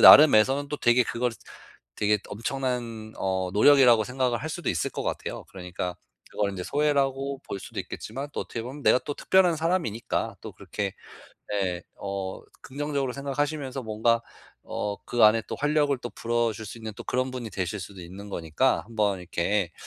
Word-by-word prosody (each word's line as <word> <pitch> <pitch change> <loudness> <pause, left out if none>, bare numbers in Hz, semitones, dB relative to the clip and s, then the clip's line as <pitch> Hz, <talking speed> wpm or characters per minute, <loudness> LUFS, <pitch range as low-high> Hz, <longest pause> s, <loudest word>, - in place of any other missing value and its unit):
나름에서는 140 0 +8
또 150 - -2
되게 120 0 +4
그걸 120 +1 -1 0.7
되게 105 0 +3
엄청난 115 -1 -3
어 95 -1 -1
노력이라고 120 -1 +6
생각을 125 -1 0
할 155 - -3
수도 175 +1 -3
있을 80 - -1
것 - - -4
같아요. - - -4
그러니까 90 -1 -5 0.3
그걸 100 -1 0
인제 95 -2 -5
소외라고 140 -2 +1
볼 100 - -4
수도 - - -5
있겠지만 135 +6 -6
또 - - -1
어떻게 115 - -5
보면 135 +4 -7
내가 - - +6
또 145 - -4
특별한 180 -3 +4
사람이니까 160 - -1
또 - - -7
그렇게 100 -2 -4 0.6
네 95 -4 -1
어 95 -1 -4 0.2
긍정적으로 140 -1 -2
생각하시면서 140 -1 -2
뭔가 115 +1 +2 0.4
어 105 -1 -3
그 120 -2 +4
안에 110 +1 +6
또 - - -3
활력을 145 -2 +2
또 120 -2 -6
불어줄 115 -1 -1
수 115 - -8
있는 110 -1 -6
또 - - -7
그런 130 +1 0
분이 125 -3 -5
되실 95 +1 -3
수도 95 0 -9
있는 95 +4 -9
거니까 80 -4 +1
한번 105 -4 +1
이렇게 90 +1 0
115 Hz, 370 characters per minute, -27 LUFS, 100-135 Hz, 0.7 s, 나름에서는